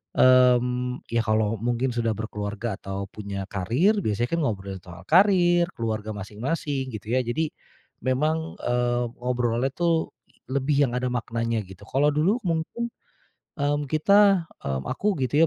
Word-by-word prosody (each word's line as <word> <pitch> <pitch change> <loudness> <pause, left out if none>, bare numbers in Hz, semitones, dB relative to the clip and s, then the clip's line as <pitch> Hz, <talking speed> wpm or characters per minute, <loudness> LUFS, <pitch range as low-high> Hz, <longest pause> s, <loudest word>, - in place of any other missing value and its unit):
mmm, 125 0 +4
ya, 115 0 +2
kalau 110 0 +1
mungkin 120 +3 0
sudah 115 -2 0
berkeluarga 105 0 -4
atau 95 0 -4
punya 100 -2 -5
karir, 130 - +2
biasanya 110 +3 0
kan, - - 0
ngobrolin 100 -4 -3
soal 90 0 -11
karir, 175 -1 +5
keluarga 110 -2 -3
masing-masing, 130 - -3
gitu, 110 0 -7
ya. 130 - +1
Jadi, 150 +6 -1 0.6
memang, 155 +5 0
eee, 120 0 +1
ngobrolnya, 125 +1 0
tuh, 170 -2 +1 0.3
lebih 140 +2 +2
yang 120 - -3
ada 125 0 -1
maknanya, 115 -1 -2
gitu. 95 0 -13
Kalau 145 +2 +2
dulu 170 +10 +2
mungkin, 175 +8 -2 0.6
mmm, 145 -1 0
kita, 195 +5 +4 0.2
mmm, 65 -1 -3
aku 205 -1 0
gitu, 145 +4 +1
125 Hz, 140 wpm, -25 LUFS, 110-150 Hz, 0.6 s, karir